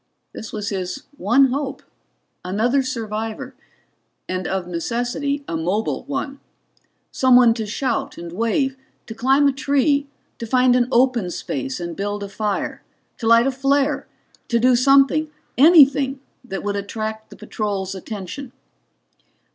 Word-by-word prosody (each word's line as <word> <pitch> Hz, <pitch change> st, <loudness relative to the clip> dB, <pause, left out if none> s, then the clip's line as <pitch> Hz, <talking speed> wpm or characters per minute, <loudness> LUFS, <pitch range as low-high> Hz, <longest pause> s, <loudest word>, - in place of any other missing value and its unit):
This 220 Hz, -, -8 dB
was 210 Hz, -2 st, -4 dB
his 190 Hz, +6 st, -4 dB
one 255 Hz, +4 st, +3 dB
hope 275 Hz, +1 st, -3 dB, 0.6 s
another 225 Hz, +9 st, +1 dB
survivor, 225 Hz, -4 st, -4 dB, 0.7 s
and 185 Hz, 0 st, -3 dB
of 190 Hz, -2 st, -2 dB
necessity 245 Hz, -, -2 dB
a 165 Hz, -, -3 dB
mobile 180 Hz, +7 st, -1 dB
one. 275 Hz, 0 st, -4 dB, 0.7 s
Someone 250 Hz, -3 st, +5 dB
to 225 Hz, -2 st, -4 dB
shout 240 Hz, +3 st, -2 dB
and 170 Hz, 0 st, -7 dB
wave, 230 Hz, -, 0 dB, 0.3 s
to 225 Hz, -, -7 dB
climb 265 Hz, +5 st, +3 dB
a -, -, +4 dB
tree, 280 Hz, +1 st, +1 dB, 0.3 s
to 230 Hz, -, -5 dB
find 255 Hz, +1 st, +4 dB
an 245 Hz, -1 st, +2 dB
open 240 Hz, -6 st, +2 dB
space 135 Hz, -5 st, -4 dB
and 170 Hz, -1 st, -5 dB
build 205 Hz, +2 st, -3 dB
a 200 Hz, -, -6 dB
fire, 210 Hz, 0 st, -3 dB, 0.4 s
to 225 Hz, -, -2 dB
light 230 Hz, +1 st, +6 dB
a 270 Hz, -, +2 dB
flare, 275 Hz, +2 st, 0 dB, 0.4 s
to 235 Hz, -, +1 dB
do 250 Hz, +2 st, +4 dB
something 275 Hz, +4 st, +4 dB, 0.3 s
anything 280 Hz, -2 st, +6 dB, 0.2 s
that 195 Hz, -6 st, -6 dB
would 205 Hz, 0 st, -2 dB
attract 220 Hz, +2 st, -5 dB
the -, -, -12 dB
patrol's 200 Hz, -3 st, -3 dB
attention. 210 Hz, +7 st, -7 dB
235 Hz, 140 wpm, -21 LUFS, 205-270 Hz, 0.7 s, light